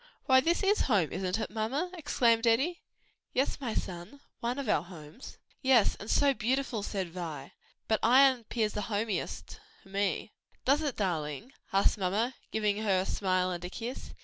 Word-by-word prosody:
why 260 Hz, -1 st, +6 dB
this 340 Hz, +8 st, +1 dB
is 405 Hz, +2 st, +3 dB
home; 195 Hz, -9 st, +3 dB
isn't 185 Hz, +2 st, -1 dB
it, -, -, -3 dB
mamma?" 255 Hz, +11 st, -2 dB
exclaimed 235 Hz, -8 st, +2 dB
Eddie. 270 Hz, +10 st, +2 dB, 0.5 s
"Yes, 275 Hz, +2 st, 0 dB
my 235 Hz, -5 st, -3 dB
son, 175 Hz, +10 st, -5 dB, 0.2 s
one 240 Hz, +2 st, -2 dB
of 280 Hz, -3 st, -4 dB
our 155 Hz, -, +3 dB
homes." 165 Hz, -, -11 dB, 0.2 s
"Yes, 260 Hz, -5 st, +4 dB
and 210 Hz, -, -8 dB
so 280 Hz, -1 st, +4 dB
beautiful," 250 Hz, 0 st, -1 dB
said 195 Hz, -4 st, -3 dB
Vi; 165 Hz, -6 st, -6 dB, 0.4 s
"but 220 Hz, -, +2 dB
Ion 255 Hz, 0 st, +5 dB
'pears 215 Hz, -2 st, -1 dB
the 210 Hz, -, -2 dB
homest 205 Hz, -, -3 dB, 0.2 s
to -, -, -18 dB
me." 195 Hz, 0 st, -1 dB, 0.3 s
"Does 280 Hz, +4 st, +4 dB
it, 290 Hz, -5 st, -2 dB
darling?" 175 Hz, -, -3 dB, 0.2 s
asked 195 Hz, +2 st, +3 dB
mamma, 205 Hz, +7 st, 0 dB, 0.2 s
giving 210 Hz, -1 st, 0 dB
her 195 Hz, -4 st, +2 dB
a -, -, -3 dB
smile 185 Hz, -2 st, 0 dB
and 175 Hz, -1 st, -5 dB
a 180 Hz, -, -4 dB
kiss. 235 Hz, +6 st, -7 dB
220 Hz, 175 wpm, -30 LUFS, 185-260 Hz, 0.5 s, why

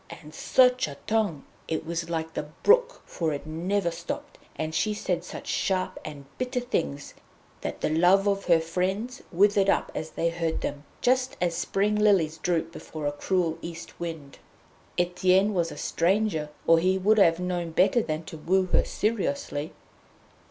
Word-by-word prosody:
And 150 Hz, -1 st, -11 dB
such 255 Hz, +7 st, +3 dB
a -, -, -8 dB
tongue! 210 Hz, -10 st, 0 dB, 0.2 s
It 160 Hz, -, -2 dB
was 170 Hz, 0 st, -3 dB
like 160 Hz, -1 st, -3 dB
the 150 Hz, -, -4 dB, 0.2 s
brook, -, -, +4 dB
for 160 Hz, -3 st, -2 dB
it 145 Hz, -, -5 dB
never 170 Hz, +4 st, -1 dB
stopped, 285 Hz, -, -6 dB, 0.2 s
and 155 Hz, 0 st, -3 dB
she 210 Hz, +6 st, 0 dB
said 180 Hz, -4 st, -2 dB
such -, -, -8 dB
sharp 185 Hz, -1 st, -1 dB
and 145 Hz, -2 st, -8 dB
bitter 250 Hz, 0 st, -1 dB
things 160 Hz, -, -3 dB, 0.5 s
that -, -, -5 dB
the -, -, +1 dB
love 180 Hz, +5 st, +4 dB
of 200 Hz, -1 st, 0 dB
her 170 Hz, -2 st, +5 dB
friends 190 Hz, +10 st, -2 dB
withered 200 Hz, +2 st, +4 dB
up -, -, +1 dB
as 155 Hz, -, -4 dB
they 170 Hz, -, 0 dB
heard 165 Hz, -1 st, -2 dB
them, 145 Hz, +1 st, -4 dB, 0.2 s
just 255 Hz, +1 st, +2 dB
as 175 Hz, -1 st, +1 dB
spring 195 Hz, +4 st, 0 dB
lilies 195 Hz, -7 st, +3 dB
droop 170 Hz, -2 st, 0 dB
before 155 Hz, -2 st, -7 dB
a 145 Hz, -, +1 dB
cruel 165 Hz, +1 st, -1 dB
East 170 Hz, 0 st, -8 dB
wind. 160 Hz, -5 st, -6 dB, 0.6 s
Etienne 185 Hz, +3 st, +3 dB
was 170 Hz, -3 st, 0 dB
a -, -, -8 dB
stranger, 175 Hz, -3 st, 0 dB, 0.2 s
or 165 Hz, 0 st, +6 dB
he 185 Hz, +3 st, +2 dB
would 210 Hz, +3 st, +3 dB
have 165 Hz, -3 st, +5 dB
known 180 Hz, -2 st, -2 dB
better 185 Hz, +8 st, +3 dB
than 155 Hz, -4 st, -3 dB
to 160 Hz, -, -9 dB
woo 185 Hz, +4 st, +2 dB
her -, -, +4 dB
seriously. 215 Hz, -, -2 dB
175 Hz, 170 wpm, -27 LUFS, 160-205 Hz, 0.6 s, or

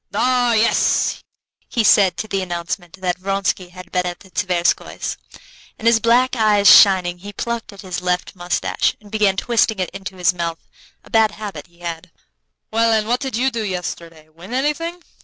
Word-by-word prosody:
"Ah! 250 Hz, -2 st, +2 dB
yes," 225 Hz, +1 st, +2 dB, 0.5 s
he 235 Hz, -, 0 dB
said, 195 Hz, -3 st, +5 dB
to 220 Hz, -, -4 dB
the 195 Hz, -2 st, -1 dB
announcement 175 Hz, 0 st, -5 dB
that 180 Hz, -1 st, -1 dB
Vronsky 195 Hz, -1 st, -1 dB
had 180 Hz, 0 st, -12 dB
been 180 Hz, -1 st, 0 dB
at 175 Hz, 0 st, -6 dB
the 190 Hz, -, -17 dB
Tverskoys'; 180 Hz, -4 st, -1 dB, 0.6 s
and 225 Hz, -, -10 dB
his 230 Hz, -1 st, +5 dB
black 245 Hz, +3 st, +3 dB
eyes 210 Hz, -3 st, +3 dB
shining, 180 Hz, -3 st, +5 dB
he 200 Hz, +3 st, -9 dB
plucked 235 Hz, +1 st, -4 dB
at 200 Hz, -, -12 dB
his 185 Hz, -3 st, -5 dB
left 180 Hz, +1 st, -2 dB
mustache, 175 Hz, 0 st, -1 dB
and 205 Hz, -1 st, -17 dB
began 205 Hz, -3 st, +2 dB
twisting 225 Hz, 0 st, +1 dB
it 185 Hz, -1 st, -2 dB
into 190 Hz, -1 st, -8 dB
his 180 Hz, 0 st, +2 dB
mouth, 170 Hz, -2 st, -3 dB, 0.5 s
a -, -, -19 dB
bad 220 Hz, -1 st, +4 dB
habit 200 Hz, -9 st, -7 dB
he 170 Hz, 0 st, -25 dB
had. 170 Hz, -1 st, -6 dB, 0.6 s
"Well, 230 Hz, +1 st, +2 dB
and 215 Hz, -1 st, +1 dB
what 245 Hz, +2 st, +1 dB
did 265 Hz, -4 st, -4 dB
you 265 Hz, +2 st, +1 dB
do 230 Hz, -2 st, -3 dB
yesterday? 170 Hz, -4 st, -6 dB
Win 175 Hz, +9 st, -9 dB
anything?" 330 Hz, +6 st, -2 dB
195 Hz, 180 wpm, -20 LUFS, 180-225 Hz, 0.6 s, said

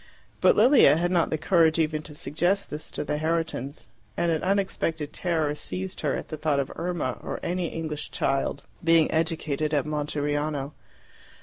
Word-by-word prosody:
But -, -, +5 dB
Lilia 240 Hz, -, +6 dB
had 175 Hz, +2 st, 0 dB
not 170 Hz, -3 st, +2 dB
the 155 Hz, -, 0 dB
courage 165 Hz, -1 st, +4 dB
even 155 Hz, -1 st, 0 dB
to 150 Hz, -1 st, -12 dB
suggest 175 Hz, +8 st, -1 dB
this 150 Hz, +1 st, -6 dB
to -, -, -4 dB
the 150 Hz, 0 st, -2 dB
Herritons, 160 Hz, -4 st, -2 dB, 0.3 s
and 170 Hz, -, +1 dB
an 160 Hz, -, 0 dB
unexpected 180 Hz, -6 st, -1 dB
terror 160 Hz, -5 st, 0 dB
seized 185 Hz, +5 st, -5 dB
her 145 Hz, -3 st, 0 dB
at -, -, -6 dB
the 155 Hz, -, -5 dB
thought 150 Hz, -2 st, +1 dB
of 140 Hz, -, -2 dB
Irma 170 Hz, -7 st, -2 dB
or -, -, -5 dB
any 175 Hz, 0 st, -1 dB
English 155 Hz, -2 st, -5 dB
child 135 Hz, +1 st, -1 dB, 0.2 s
being 165 Hz, -1 st, +4 dB
educated 155 Hz, -2 st, 0 dB
at 145 Hz, -, +1 dB
Monteriano. 145 Hz, -1 st, -2 dB
155 Hz, 170 wpm, -26 LUFS, 150-170 Hz, 0.3 s, Lilia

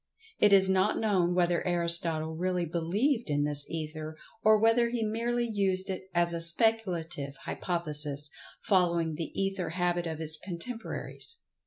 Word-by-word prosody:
It 210 Hz, -, +4 dB
is 195 Hz, -1 st, +6 dB
not 190 Hz, +2 st, +1 dB
known 185 Hz, -5 st, +1 dB
whether 175 Hz, -1 st, +1 dB
Aristotle 170 Hz, -2 st, +3 dB
really 180 Hz, +1 st, -1 dB
believed 195 Hz, -, -1 dB
in 145 Hz, 0 st, 0 dB
this 145 Hz, -1 st, -2 dB
Ether, 155 Hz, -1 st, -6 dB, 0.2 s
or 215 Hz, 0 st, +5 dB
whether 225 Hz, +2 st, +3 dB
he 235 Hz, -1 st, -2 dB
merely 235 Hz, +2 st, -1 dB
used 195 Hz, -3 st, 0 dB
it 190 Hz, 0 st, -7 dB
as 170 Hz, 0 st, +2 dB
a 170 Hz, -, -3 dB
speculative 170 Hz, -6 st, +1 dB
hypothesis, 150 Hz, -4 st, -1 dB, 0.3 s
following 170 Hz, -4 st, +1 dB
the 160 Hz, +2 st, -5 dB
Ether 195 Hz, -1 st, -2 dB
Habit 175 Hz, 0 st, -1 dB
of 160 Hz, -1 st, -5 dB
his 160 Hz, 0 st, +1 dB
contemporaries. 225 Hz, -, -3 dB
175 Hz, 145 wpm, -29 LUFS, 160-205 Hz, 0.3 s, is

